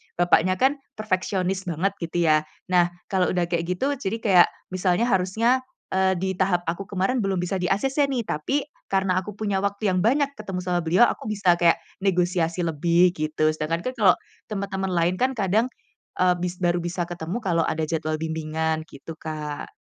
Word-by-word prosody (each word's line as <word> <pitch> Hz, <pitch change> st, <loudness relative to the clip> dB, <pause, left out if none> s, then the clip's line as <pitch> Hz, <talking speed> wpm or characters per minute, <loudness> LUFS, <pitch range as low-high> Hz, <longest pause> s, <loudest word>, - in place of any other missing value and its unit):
bapaknya 175 Hz, +1 st, +3 dB
kan 270 Hz, +7 st, +2 dB, 0.2 s
perfeksionis 190 Hz, -2 st, -1 dB
banget 175 Hz, +5 st, 0 dB
gitu 170 Hz, +1 st, -3 dB
ya 155 Hz, -1 st, +4 dB, 0.3 s
nah 175 Hz, -1 st, +5 dB, 0.2 s
kalau 185 Hz, -2 st, +2 dB
udah 175 Hz, -1 st, +2 dB
kayak 170 Hz, -1 st, +1 dB
gitu 265 Hz, +11 st, 0 dB
jadi 225 Hz, -4 st, -3 dB
kayak 185 Hz, -5 st, +6 dB, 0.3 s
misalnya 185 Hz, +4 st, +1 dB
harusnya, 225 Hz, +6 st, +2 dB, 0.3 s
eee, 190 Hz, 0 st, +3 dB
di 190 Hz, 0 st, -1 dB
tahap 180 Hz, -2 st, +1 dB
aku 170 Hz, +4 st, -2 dB
kemarin 200 Hz, +6 st, 0 dB
belum 195 Hz, -1 st, 0 dB
bisa 180 Hz, +2 st, -2 dB
di-acc 205 Hz, +9 st, 0 dB
nih 250 Hz, -4 st, -1 dB
tapi 150 Hz, -, -1 dB, 0.3 s
karena 190 Hz, -1 st, +1 dB
aku 205 Hz, +2 st, -7 dB
punya 205 Hz, -3 st, -1 dB
waktu 200 Hz, +1 st, -1 dB
yang 185 Hz, -, +1 dB
banyak 280 Hz, +4 st, +3 dB
ketemu 195 Hz, -4 st, -4 dB
sama 180 Hz, -1 st, 0 dB
beliau 180 Hz, +8 st, +5 dB
aku -, -, -5 dB
bisa 190 Hz, -5 st, +2 dB
kayak 170 Hz, -1 st, +3 dB, 0.2 s
negosiasi 175 Hz, -2 st, +1 dB
lebih 170 Hz, +2 st, +3 dB
gitu 155 Hz, 0 st, +1 dB
sedangkan 155 Hz, +2 st, -2 dB
kan 255 Hz, -, -3 dB
kalau 195 Hz, -4 st, +6 dB, 0.3 s
teman-teman 195 Hz, -2 st, -3 dB
lain 170 Hz, +1 st, +2 dB
kan 260 Hz, +1 st, +2 dB
kadang, 215 Hz, +3 st, +2 dB, 0.5 s
eee, 180 Hz, -1 st, +4 dB
bis 180 Hz, 0 st, -2 dB
baru 175 Hz, 0 st, +2 dB
bisa 175 Hz, +1 st, -2 dB
ketemu 175 Hz, +4 st, -4 dB
kalau 170 Hz, -3 st, +1 dB
ada 160 Hz, 0 st, -1 dB
jadwal 155 Hz, -1 st, -1 dB
bimbingan 160 Hz, 0 st, -2 dB
gitu, 145 Hz, +4 st, -10 dB
Kak. 150 Hz, -2 st, -5 dB
180 Hz, 175 wpm, -24 LUFS, 170-195 Hz, 0.5 s, kayak